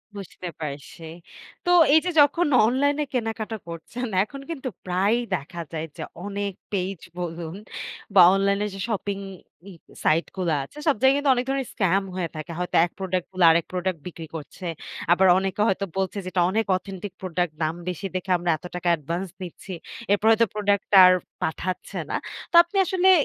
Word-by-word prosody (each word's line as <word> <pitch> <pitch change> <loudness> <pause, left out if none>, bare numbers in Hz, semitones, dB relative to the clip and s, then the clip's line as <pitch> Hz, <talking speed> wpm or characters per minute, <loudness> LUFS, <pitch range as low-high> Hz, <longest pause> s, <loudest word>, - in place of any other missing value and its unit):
বুঝতে 185 -2 -8
পারছি। 145 +2 -7 0.6
তো - - 0 0.2
এই 320 - +8
যে - - +1
যখন 295 +4 +3 0.2
অনলাইনে 285 +5 +2
কেনাকাটা 225 -2 -2
করছেন 220 +9 -6 0.2
এখন 275 +6 -9
কিন্তু 270 -5 -4 0.2
প্রায়ই 200 +7 +1
দেখা 170 +2 -6
যায় 160 0 -4
যে, - - -4 0.2
অনেক 200 -1 -3 0.2
পেইজ 190 -2 -2 0.2
বলুন 165 0 -5 0.6
বা 185 - +9
অনলাইন 200 +1 +2
এ - - -1
যে 195 - -8
শপিং 200 -2 -2 0.5
ই - - -11 0.3
সাইট 160 +2 +3
গুলো 175 -4 0
আছে। 290 - -14
সব 290 - +4
জায়গায় 265 +1 +5
কিন্তু 285 -2 +3
অনেক 245 +1 -1
ধরনের 270 -2 -1
স্কাম 195 0 +2
হয়ে 175 -3 -2
থাকে। 155 +2 -6
হয়তো 180 - -3
এক 175 - -9
প্রোডাক্ট 185 -2 -1
বলে 185 -2 +4
আরেক 165 0 +2
প্রোডাক্ট 180 -2 -1
বিক্রি 165 -2 -8
করছে। 160 +4 -8 0.5
আবার 185 +2 +5
অনেকে 195 +1 -1
হয়তো 195 +1 +1
বলছে 190 +1 -1
যে - - -8
এটা 180 - +1
অনেক 220 +2 +1
অথেন্টিক 190 0 -8
প্রোডাক্ট 175 -2 -1
দাম 155 +1 0
বেশি 180 +2 -4
দেখে 185 +1 -2
আমরা 175 0 -3
এত 180 - -15
টাকা 180 0 -3
অ্যাডভান্স 170 +4 -2
নিচ্ছি। 185 +2 -8 0.4
এরপর 205 +1 +2
হয়তো 230 +1 +4
প্রোডাক্ট 205 -1 +1
টা - - +9
আর 185 - +7 0.3
পাঠাচ্ছে 180 +3 -3
না। - - -2 0.4
তো - - -1
আপনি 370 +3 -6
আসলে 375 +1 +3
190 Hz, 180 wpm, -24 LUFS, 175-220 Hz, 0.6 s, বা